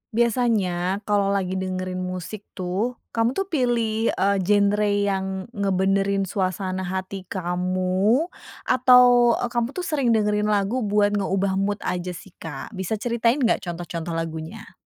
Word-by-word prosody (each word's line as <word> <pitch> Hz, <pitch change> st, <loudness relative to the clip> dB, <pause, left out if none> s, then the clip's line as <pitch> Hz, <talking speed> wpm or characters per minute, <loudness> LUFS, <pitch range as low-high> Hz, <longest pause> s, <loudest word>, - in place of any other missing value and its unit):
Biasanya 210 Hz, -6 st, +1 dB
kalau 205 Hz, -1 st, +1 dB
lagi 190 Hz, -1 st, -1 dB
dengerin 185 Hz, -1 st, -3 dB
musik 185 Hz, +3 st, -6 dB
tuh, 190 Hz, +7 st, -2 dB, 0.2 s
kamu 230 Hz, +2 st, +1 dB
tuh 390 Hz, -1 st, -1 dB
pilih, 230 Hz, -6 st, +1 dB
eee, 200 Hz, +1 st, +2 dB
genre 205 Hz, +2 st, +2 dB
yang 200 Hz, -1 st, 0 dB, 0.3 s
ngebenerin 195 Hz, -1 st, +1 dB
suasana 185 Hz, 0 st, -2 dB
hati 190 Hz, 0 st, -5 dB
kamu 185 Hz, -, 0 dB, 0.4 s
atau, 250 Hz, -2 st, +6 dB
eee, 245 Hz, -, -3 dB
kamu 240 Hz, -1 st, 0 dB
tuh 365 Hz, -, -3 dB
sering 275 Hz, -9 st, +1 dB
dengerin 210 Hz, -1 st, +1 dB
lagu 210 Hz, +3 st, +1 dB
buat 205 Hz, -2 st, +2 dB
ngeubah 195 Hz, -1 st, 0 dB
mood 205 Hz, +1 st, -1 dB
aja 180 Hz, 0 st, -3 dB
sih, 195 Hz, -, -12 dB
Kak? 150 Hz, +2 st, -7 dB
Bisa 190 Hz, 0 st, -3 dB
ceritain 235 Hz, +4 st, +1 dB
gak 235 Hz, -, +3 dB
contoh-contoh 170 Hz, -1 st, -4 dB
lagunya? 165 Hz, +6 st, -5 dB
200 Hz, 135 wpm, -23 LUFS, 185-225 Hz, 0.4 s, atau